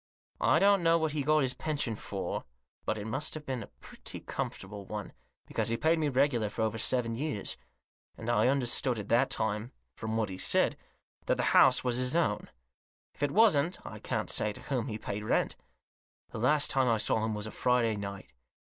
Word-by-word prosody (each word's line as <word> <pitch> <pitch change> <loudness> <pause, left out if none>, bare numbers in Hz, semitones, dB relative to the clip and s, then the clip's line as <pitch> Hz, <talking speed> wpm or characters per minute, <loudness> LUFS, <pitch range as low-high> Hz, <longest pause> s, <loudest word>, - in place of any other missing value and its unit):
I - - +4
don't 200 -1 +5
know 165 0 +4
what 160 -2 0
he 150 0 -1
got 155 +1 +3
his 130 -1 0
pension 145 -7 -2
for, - - -4 0.4
but 110 - 0
it 105 - -5
must 135 +9 -2
have 155 -1 -7
been 130 -3 -3
a - - -8
pretty - - -7
comfortable 100 +1 -5
one, 105 0 -6 0.3
because - - -1
he 115 - 0
paid 160 +4 +2
me 150 -2 +1
regular 130 -5 +2
for 110 - -2
over 110 0 -1
seven 115 0 +1
years; 135 -4 -3 0.6
and 110 - -8
I 120 +1 +3
under 135 -2 +1
stood 120 0 +2
at 105 -1 -6
that 125 +4 +4
time, 110 +3 -2 0.2
from 110 -1 -3
what 110 -3 0
he 95 0 -7
said, - - +3 0.5
that - - +2
the - - 0
house - - +6
was 125 -1 0
his 125 +3 +1
own. 115 -12 0 0.6
If - - -17
it 145 - +2
wasn't 180 -4 +4
I - - -8
can't - - -2
say 105 - +1
to - - -11
whom 130 -4 -2
he 110 -4 -3
paid 105 -1 -4
rent. - - +1 0.8
The - - -5
last 145 +5 +3
time 130 -1 +2
I 115 -2 +3
saw 110 +1 +1
him 110 -1 -1
was 105 0 -4
a 110 - -6
Friday 120 -3 +2
night. 100 -8 -7
120 Hz, 210 wpm, -30 LUFS, 110-145 Hz, 0.8 s, house